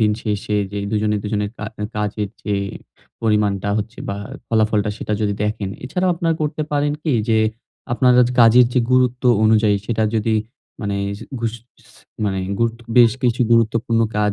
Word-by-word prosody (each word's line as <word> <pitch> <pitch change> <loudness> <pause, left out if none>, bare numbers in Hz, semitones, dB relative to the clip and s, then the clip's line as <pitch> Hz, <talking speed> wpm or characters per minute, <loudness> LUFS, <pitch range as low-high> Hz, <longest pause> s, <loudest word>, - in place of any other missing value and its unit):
দিনশেষে 105 -1 0 0.2
যে, 100 - -3
২ 110 - 0
জনে, 105 0 +1
২ - - -5
জনের 105 -1 -1
কা - - -6 0.2
আ - - -1
কাজের 105 -1 -2 0.2
যে 105 - 0 0.7
পরিমাণটা 105 -2 +1
হচ্ছে 110 +3 -5
বা, 100 - -2 0.3
ফলাফলটা 110 -2 +2
সেটা 105 - -4
যদি 100 -1 0
দেখেন, 105 -2 -2 0.2
এছাড়াও 180 +7 0
আপনারা 165 -1 0
করতে 150 +1 -2
পারেন 145 0 +1
কি? 155 - 0 0.2
যে, 110 - +3 0.5
আপনার 125 +1 +4
আজ 120 - +2
কাজের 120 +1 +7
যে 125 - +4
গুরুত্ব 125 0 +2 0.2
অনুযায়ী 110 -1 +4
সেটা 110 -2 0
যদি 110 0 +1 0.5
মানে 100 -1 -2 0.2
যে 115 - -9 0.2
ঘুস 115 0 -1 0.4
স - - -23 0.3
মানে 95 -2 -1 0.2
গুরুত্ব 115 0 -1 0.2
বেশ 115 -2 +7
কিছু 125 0 +1
গুরুত্বপূর্ণ 115 0 +2 0.2
কাজ 105 -1 +2
110 Hz, 170 wpm, -20 LUFS, 105-120 Hz, 0.7 s, কাজের